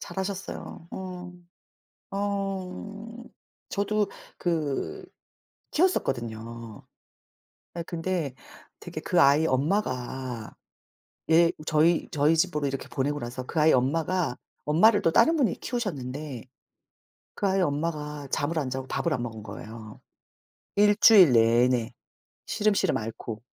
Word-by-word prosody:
잘하셨어요. 190 -3 -6
어. 180 -1 -7 0.8
어. 200 +3 -4 0.5
저도 205 0 0 0.3
그 155 -5 -2 0.7
키웠었거든요. 115 - -1 0.9
아 170 - -3
근데 165 -5 -2 0.5
되게 - - -7
그 - - +2
아이 140 +3 +5
엄마가 130 - -2 0.8
얘 165 +1 +6 0.2
저희 160 +2 +3
저희 150 +2 +3
집으로 155 -4 +1
이렇게 135 0 -4
보내고 145 +2 -1
나서 125 +1 -6
그 160 - -2
아이 155 - +6
엄마가 155 +3 +1 0.3
엄마를 205 +9 +5
또 165 - +3
다른 325 - +5
분이 250 - +1
키우셨는데 145 - -4 0.9
그 200 - 0
아이 190 0 +2
엄마가 150 -2 -2
잠을 160 +3 0
안 140 -4 -2
자고 130 0 -4
밥을 170 +3 -1
안 125 -4 -2
먹은 110 -3 -6
거예요, 110 +1 -9 0.7
1 205 0 +5
주일 190 - +8
내내 115 +1 +3 0.5
시름시름 210 -2 +1
앓고. 110 0 -5
155 Hz, 230 characters per minute, -27 LUFS, 130-190 Hz, 0.9 s, 주일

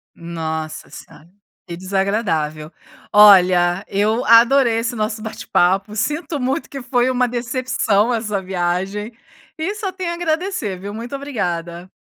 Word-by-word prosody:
Nossa 160 -2 -5
senhora, 160 - -14 0.4
que 170 -2 -7
desagradável. 180 -5 -2 0.4
Olha, 185 -3 +6
eu 215 +5 0
adorei 230 +1 +5
esse 245 +2 -2
nosso 215 0 -2
bate-papo, 205 -3 0
sinto 295 +7 -2
muito 260 +1 -2
que 275 -2 -7
foi 245 0 +1
uma 250 -1 +1
decepção 245 -3 0
essa 215 -4 -2
viagem, 190 +4 -2 0.4
e 345 +5 -3
só 405 -3 -4
tenho 370 -2 -4
a - - -3
agradecer, 325 - -2
viu. 200 +2 -6
Muito 235 +5 -7
obrigada. 175 -10 -4
215 Hz, 130 wpm, -19 LUFS, 185-250 Hz, 0.4 s, Olha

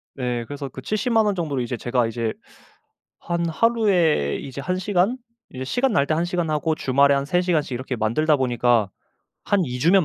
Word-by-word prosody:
네. 125 -3 -2
그래서 145 +1 -6
그 130 - -9
70 215 - -1
만 220 -1 +4
원 205 -2 +1
정도로 150 -7 -2
이제 120 0 -3
제가 120 -1 0
이제 115 -1 -2 0.9
한 170 0 -2
하루에 180 - +2
이제 140 +1 -7
1 185 +3 -2
시간 200 +5 +1 0.4
이제 130 0 -5
시간 245 - 0
날 140 -7 +3
때 155 - +1
1 170 +2 0
시간 175 -2 -2
하고 155 +1 0
주말에 140 +1 +3
한 140 0 0
3 175 +4 +1
시간씩 160 -7 0
이렇게 125 +1 -3
만들다 130 +8 +2
보니까 120 -5 +2 0.6
한 200 -4 +2
2 125 -1 -5
주면 175 +5 +4
150 Hz, 315 characters per minute, -23 LUFS, 125-180 Hz, 0.9 s, 만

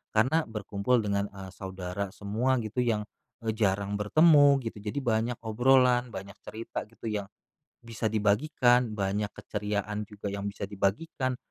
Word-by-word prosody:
karena 130 +9 +3
berkumpul 110 +2 0
dengan, 100 0 0
eee, 95 -1 -10
saudara 95 0 -5
semua 110 +6 0
gitu 110 +3 -4
yang, 110 -3 +1 0.4
eee, 110 - 0
jarang 100 -2 0
bertemu 145 +4 +6
gitu, 115 -2 -5
jadi 105 +6 -3
banyak 115 -1 0
obrolan, 125 +2 +4
banyak 100 +1 -8
cerita 115 +1 -6
gitu 115 +1 -7
yang 105 -2 -2 0.6
bisa 115 -1 -2
dibagikan, 120 +2 +2
banyak 100 +1 -1
keceriaan 105 0 -3
juga 105 -1 -6
yang 100 0 -3
bisa 100 0 -5
dibagikan, 115 +7 -1
105 Hz, 140 wpm, -29 LUFS, 100-125 Hz, 0.6 s, bertemu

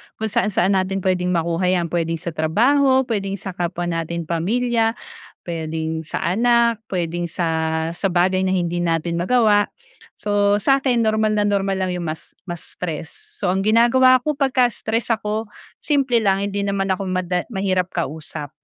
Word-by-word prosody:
kung 220 -1 -3
saan 235 -2 +2
saan 195 -1 +2
natin 190 0 -2
pwedeng 180 -1 +1
makuha 170 +2 0
yan, 175 -3 +1
pwedeng 165 -1 0
sa 170 0 -4
trabaho, 260 - +3
pwedeng 195 -2 -1
sa 195 -1 -6
kapwa 175 0 -3
nating 170 0 -2
pamilya, 225 +8 0 0.5
pwedeng 160 -1 -3
sa 160 - -4
anak, 235 +4 +2
pwedeng 175 -2 -2
sa 175 - -2 0.5
sa 195 +1 -1
bagay 185 +2 +2
na 190 - +1
hindi 175 -2 0
natin 170 0 0
magawa. 205 +3 +3 0.5
So 205 0 +2
sa'kin 265 +3 +2
normal 215 -1 +1
na 205 - +2
normal 195 -1 0
lang 185 -1 -1
yung 175 -1 -4
mas 155 - -8
ma-stress. 170 -2 -7
So 200 - -2
ang 190 - 0
ginagawa 240 +4 +5
ko 300 - +1
pagka 270 -3 +2
stress 230 0 -1
ako 215 0 -3 0.3
simple 275 -5 +2
lang, 195 -3 +1
hindi 200 0 -2
naman 195 -1 -1
ako 190 +1 -1
mada 180 -1 -1
mahirap 185 -2 0
kausap. 155 -3 -4
190 Hz, 160 wpm, -21 LUFS, 175-220 Hz, 0.5 s, ginagawa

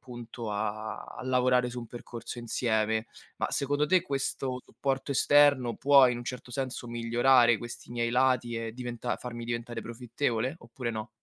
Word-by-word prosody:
appunto, 120 -2 -7
a 105 +1 -3
a - - -9
lavorare 125 -1 +3
su 125 - -6
un 120 - -8
percorso 120 0 -8
insieme. 110 -1 0 0.3
Ma, - - -1
secondo 145 +2 +1
te 185 +3 +4
questo 135 -4 -2
supporto 135 +3 -3
esterno 140 -4 +4
può 140 -2 +7
in 120 -1 0
un 120 - -7
certo 125 0 -6
senso 130 -1 -4
migliorare 120 +2 +1 0.3
questi 120 +1 -9
miei 120 -1 -1
lati 125 -1 +2
e 115 -1 -4
diventa 120 -1 -4
farmi 120 -1 -7
diventare 120 0 -4
profittevole, 120 +2 -2
oppure 120 +1 -5
no? 110 0 -5
120 Hz, 160 wpm, -29 LUFS, 115-130 Hz, 0.3 s, può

